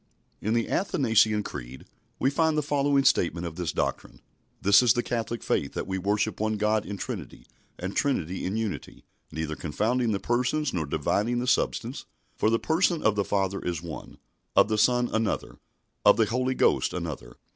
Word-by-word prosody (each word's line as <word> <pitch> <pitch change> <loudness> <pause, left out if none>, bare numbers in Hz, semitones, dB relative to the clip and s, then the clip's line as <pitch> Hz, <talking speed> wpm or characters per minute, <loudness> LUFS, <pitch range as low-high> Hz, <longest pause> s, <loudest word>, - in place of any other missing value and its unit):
In 110 +3 0
the 115 - +1
Athanasian 110 - +2
Creed 65 -5 -8 0.3
we 135 - +1
find 160 +1 +2
the 150 - +1
following 140 -1 +2
statement 85 -7 +2
of 85 -2 -6
this 85 -3 -2
doctrine: - - -3 0.4
"This 100 +3 +6
is 120 -2 +5
the 120 - -1
Catholic 115 0 -3
Faith, 70 - -1
that - - -3
we 95 +1 -3
worship 105 +3 0
one 110 0 0
God 105 0 +1
in 100 - -5
Trinity, - - -6 0.3
and 95 +2 -5
Trinity 95 - 0
in 95 +4 -2
Unity. 110 -4 -4 0.3
Neither 80 -1 -3
confounding 115 +10 0
the 100 - 0
Persons 125 +7 0
nor 80 -4 -2
dividing 115 +10 0
the 120 - -1
Substance. 125 +1 0 0.3
For 110 - +2
the 115 - +3
Person 165 +3 +1
of 110 - +3
the 100 - +1
Father 100 -1 -1
is 85 -2 -3
one, 80 -3 -8 0.4
of - - +5
the 110 - +1
Son 125 +2 +3
another, 110 -1 -1 0.4
of - - +6
the 110 - +4
Holy 130 +4 -1
Ghost - - +2
another. - - -6
110 Hz, 180 wpm, -27 LUFS, 95-125 Hz, 0.4 s, This